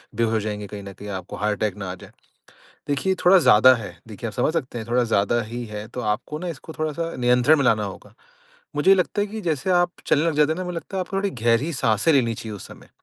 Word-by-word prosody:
बेहोश 115 0 +1
हो 110 - +2
जाएँगे, 105 -1 -4
कहीं 100 0 -8
न 100 0 -9
कहीं 105 +2 -10
आपको 95 -2 -6
हार्ट 105 0 -1
अटैक 105 -4 0
ना 95 -2 -5
आ - - -6
जाए। - - -14 0.8
देखिए 145 +7 +1
थोड़ा 185 +2 +7
ज़्यादा 130 -5 +7
है, 115 -4 -7
देखिए 110 +2 -6
आप - - -7
समझ 155 - +1
सकते 130 -7 -3
हैं 110 - -6
थोड़ा 120 +1 +2
ज़्यादा 115 +1 +1
ही 120 +2 -6
है 105 -1 -7
तो 125 - -6
आपको 115 +7 -2
ना 180 +2 -5
इसको 160 0 -8
थोड़ा 155 -1 -1
सा 165 +2 -4
नियंत्रण 125 +4 +4
में 140 - +1
लाना 110 -3 +3
होगा। 100 - -9 0.6
मुझे 190 - +3
ये - - +9
लगता 180 +2 0
है - - -1
कि 220 +2 -6
जैसे 165 -2 -1
आप 175 -1 +3 0.2
चलने 150 - +3
लग 165 -2 +1
जाते 150 +1 +3
हैं 160 - -5
ना 185 - -3
मुझे 180 -1 -5
लगता 190 +3 -6
है - - 0
आपको 185 +1 -4
थोड़ी 195 +1 0
गहरी 120 +8 +2
साँसें 115 +1 +2
लेनी 120 -5 +2
चाहिए 110 -1 -7
उस - - -10
समय। - - -14
125 Hz, 265 wpm, -23 LUFS, 105-165 Hz, 0.8 s, ये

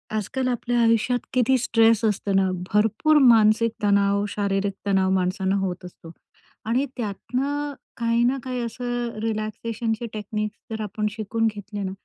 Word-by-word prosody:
आजकाल 255 +5 -2
आपल्या 245 0 -1
आयुष्यात 230 +2 +2
किती 255 +1 +3
स्ट्रेस 230 -2 +3
असतं 205 -2 0
ना 190 -1 +3 0.2
भरपूर 220 +9 +3
मानसिक 225 0 +5
तणाव, 200 0 +3
शारीरिक 200 -1 -1
तणाव 190 -1 +2
माणसांना 190 +1 0
होत 185 -1 -3
असतो. 170 -2 -12 0.5
आणि 245 +5 +1
त्यातनं 270 +7 -3 0.2
काही 230 0 +1
ना 255 +3 +2
काही 255 -1 -3
असं 240 0 -3
रिलॅक्सेशनचे 225 +1 -3
टेक्निक्स 215 0 -4
जर 220 0 -3
आपण 210 +1 -3
शिकून 225 +1 -1
घेतले 205 0 -6
ना, 190 - -3
220 Hz, 140 wpm, -24 LUFS, 200-240 Hz, 0.5 s, मानसिक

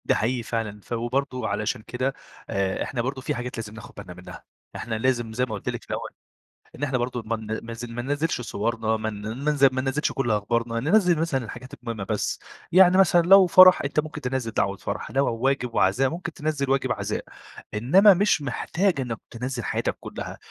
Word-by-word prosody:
ده - - +3
حقيقي 120 +2 0
فعلًا 110 -2 -3
ف - - -23
وبرضو 125 +1 -2
علشان 105 +3 -2
كده 130 +4 -2 0.4
آآ، 95 -1 -1
إحنا 125 - -3
برضو 130 +2 -3
في - - -2
حاجات 125 0 -5
لازم 110 -2 -6
ناخد 110 - -12
بالنا - - -8
منّها، - - -11 0.3
إحنا 110 0 -4
لازم 120 -1 0
زي 125 +3 +1
ما 115 - -7
قُلت 100 - -5
لِك - - -5
في - - -22
الأول - - -3 0.7
إن - - -11
إحنا 135 -3 0
برضو 120 0 -3
ما 115 +1 -1
بن 110 0 -5
ما 115 - -6
ز 115 +1 -6
ما 120 0 -5
ننزّلش 145 +2 -1
صورنا 115 -1 -1
ما 110 0 -3
ن 105 -1 -8
ننز 140 +7 0
ما 130 -1 +4
ننزّلش 135 +3 -1
كُلّ 135 -4 -1
أخبارنا، 115 +2 0
ننزّل 175 - +3
مثلًا 140 -6 0
الحاجات 125 +3 -9
المهمة 115 -4 -6
بس، 105 +1 -2 0.3
يعني 185 +1 +7
مثلًا 175 -2 +5
لو 190 +2 +7
فَرح 185 +1 +8
أنت 140 +2 +1
ممكن 155 0 -8
تنزّل 125 -2 -2
دعوة 100 -1 0
فَرح، - - -5
لو 135 +1 +2
و 115 - -3
واجب 130 -3 0
وعزاء 125 +8 +3
ممكن 175 +1 -5
تنزّل 150 -3 -2
واجب 135 -1 +1
عزاء، - - -3 0.5
إنّما 180 - +6
مش 195 -3 +2
محتاج 160 +5 0
إنِّك 115 -3 -4
تنزّل 125 +1 -4
حياتك - - -2
كلّها، - - -7
125 Hz, 205 wpm, -25 LUFS, 115-140 Hz, 0.7 s, فَرح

